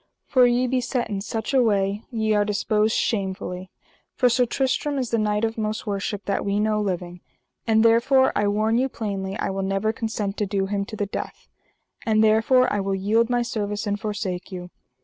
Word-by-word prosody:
for 255 -2 +5
ye 245 +1 +2
be 255 0 0
set 240 -2 -2
in 195 -1 -2
such 220 +5 -4
a 265 - +5
way 200 -2 +1
ye 220 -3 0
are 205 -1 +3
disposed 210 +1 +1
shamefully; 190 -3 -2 0.5
for 250 - +3
Sir 245 +1 +2
Tristram 270 +3 0
is 255 -4 -2
the 230 - +2
knight 210 +1 +1
of 225 0 -3
most 215 0 -2
worship 205 0 -3
that 200 - -1
we 200 0 0
know 215 0 +1
living, 180 -3 -3 0.5
and 220 0 +4
therefore 255 +4 +4
I 205 - +2
warn 215 +3 +1
you 265 +1 +1
plainly 195 -4 -4
I - - -2
will 195 0 -3
never 195 +3 0
consent 220 -3 -3
to 210 - -1
do 195 0 0
him 200 0 -2
to 215 - -8
the 205 - -1
death; 200 - -6 0.6
and 220 -1 +3
therefore 225 +4 +4
I 205 - 0
will 195 0 -1
yield 220 +5 +2
my 245 -1 +1
service, 210 -3 -3
and 205 0 -1
forsake 200 -4 -4
you. 180 -1 -7
215 Hz, 205 wpm, -24 LUFS, 200-230 Hz, 0.6 s, for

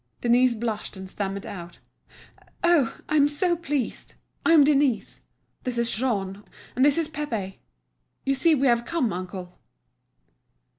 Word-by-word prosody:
Denise 245 +1 +4
blushed 220 -3 -4
and 190 0 -8
stammered 195 +1 -4
out: 175 -6 -8 0.9
"Oh, 335 -8 +3
I'm 295 -2 +4
so 345 +4 0
pleased! 295 -6 -3 0.3
I - - +3
am 310 -3 +8
Denise. 280 -4 +1 0.4
This 250 -1 -3
is 235 0 +1
Jean, 205 -5 -2 0.3
and 255 - +2
this 285 +1 +5
is 330 -2 +1
Pépé. 235 -11 -4 0.7
You 275 - +2
see 310 +4 +4
we 275 -1 +1
have 235 -2 +3
come, 260 - -1
uncle." 180 0 -7
245 Hz, 140 wpm, -25 LUFS, 200-290 Hz, 0.9 s, am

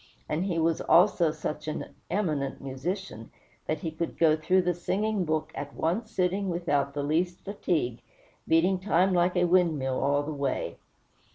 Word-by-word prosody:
And 165 +5 -1
he 180 -4 -1
was 165 0 +1
also 170 -1 +4
such 150 0 -5
an 155 - -4 0.2
eminent 155 -8 -1
musician, 135 - -5 0.4
that 155 -1 -1
he 165 - -3
could 165 +1 -4
go 160 -2 +5
through 180 +4 +2
the 180 0 +1
singing 200 +3 -1
book 155 0 -1
at 145 0 -6
one 185 +8 -1
sitting 190 0 0
without 145 -5 0
the 145 - -1
least 175 +4 -1
fatigue, 170 - -1 0.5
beating 180 +3 +3
time 185 0 +2
like 180 +1 +2
a 175 - +4
windmill 160 -8 +2
all 145 +1 +2
the 155 +1 -4
way. 140 -2 -2
165 Hz, 165 wpm, -28 LUFS, 150-180 Hz, 0.5 s, go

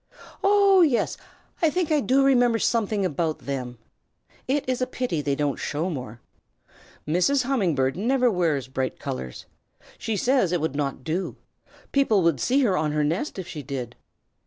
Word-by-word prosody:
"Oh 395 -1 +5
yes! 285 -8 +2 0.5
I 325 - +4
think 350 0 -1
I 305 - +4
do 270 0 +3
remember 245 -4 +4
something 215 -3 0
about 160 -1 -1
them. 125 -3 -5 0.7
It 275 +1 0
is 255 -1 -1
a 255 - +1
pity 250 -12 -2
they 140 -1 0
don't 145 -1 -1
show 160 +5 -2
more. 125 -6 -6 0.9
Mrs. 180 - +2
Humming 230 - +1
Bird 135 0 +1
never 245 +4 +2
wears 160 - 0
bright 130 0 -3
colors. 65 -1 -6 0.5
She 220 -2 -2
says 250 -4 +2
it 175 - +1
would 155 -2 -2
not 140 -2 -2
do. 170 +6 -2 0.6
People 225 -9 +3
would 165 -5 +2
see 270 - +2
her 210 -8 +2
on 155 -4 0
her 150 0 +1
nest 170 - -2
if 185 - -5
she 150 - -6
did. 125 -3 -6
185 Hz, 170 wpm, -25 LUFS, -, 0.9 s, Oh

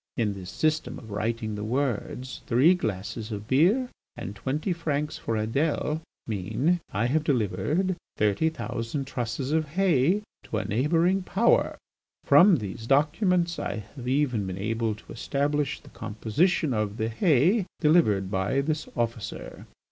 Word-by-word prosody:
In 110 -4 +1
this 95 -2 -8
system 155 0 0
of 110 -4 -11
writing 110 +1 -2
the 105 0 -4
words 125 0 -2
'Three 130 +9 +5
glasses 110 - -4
of 105 0 -5
beer 185 - +3 0.3
and 100 - -6
twenty 145 - -1
francs 150 -3 -2
for 115 - -2
Adèle' 145 +7 0 0.2
mean 115 - 0
'I 105 +4 0
have 150 +5 +1
delivered 145 - 0 0.2
thirty 105 +9 +2
thousand 135 -3 -4
trusses 125 +1 -3
of 155 0 +1
hay 180 +2 +2 0.2
to 110 - -3
a - - -2
neighbouring 165 - +2
Power.' 200 +5 +2 0.5
From 195 -1 +7
these 110 -2 -5
documents 170 - +2
I 100 - -2 0.2
have 125 -3 -7
even 125 -7 +1
been 95 0 -4
able 110 +2 -1
to 105 - -12
establish 145 +3 -1
the - - -16
composition 120 - 0
of 105 -1 -1
the 110 - 0
hay 175 - +3
delivered 110 - +3
by 100 +8 +1
this 155 +2 -2
officer. 115 -2 -4
130 Hz, 145 wpm, -27 LUFS, 110-160 Hz, 0.5 s, From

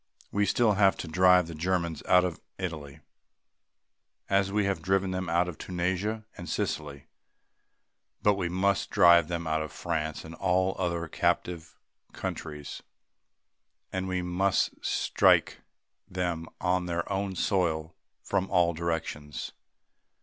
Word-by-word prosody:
We 105 0 +1
still 115 -3 +3
have 95 -2 +4
to - - -5
drive 90 +2 +5
the 85 - -8
Germans 85 -1 -1
out 90 0 +5
of 85 -3 -4 0.2
Italy 80 -7 -6 1.3
as 100 0 +3
we 105 0 +1
have 100 -1 -1
driven 95 0 +1
them 95 -1 -3
out 85 +1 +2
of 90 - -7
Tunisia 95 +5 -2
and 90 -2 -8
Sicily; 70 -3 -3 1.2
we 100 -4 +2
must 95 +2 +1
drive 85 -4 +6
them 85 -1 -3
out 80 0 0
of 80 - -5
France 80 -2 -3
and 80 - -9
all 95 +1 +1
other 85 -2 -1
captive 85 +1 -1 0.4
countries; 75 -2 -6 1.1
and 95 0 -2
we 90 -1 -1
must 90 +2 0
strike - - +3 0.5
them 85 -3 -2
on 90 0 0
their 85 0 -2
own 95 -1 -2
soil 80 -5 0 0.3
from 95 - -1
all 85 -2 +3
directions. 80 -3 -4
90 Hz, 130 wpm, -28 LUFS, 85-95 Hz, 1.3 s, drive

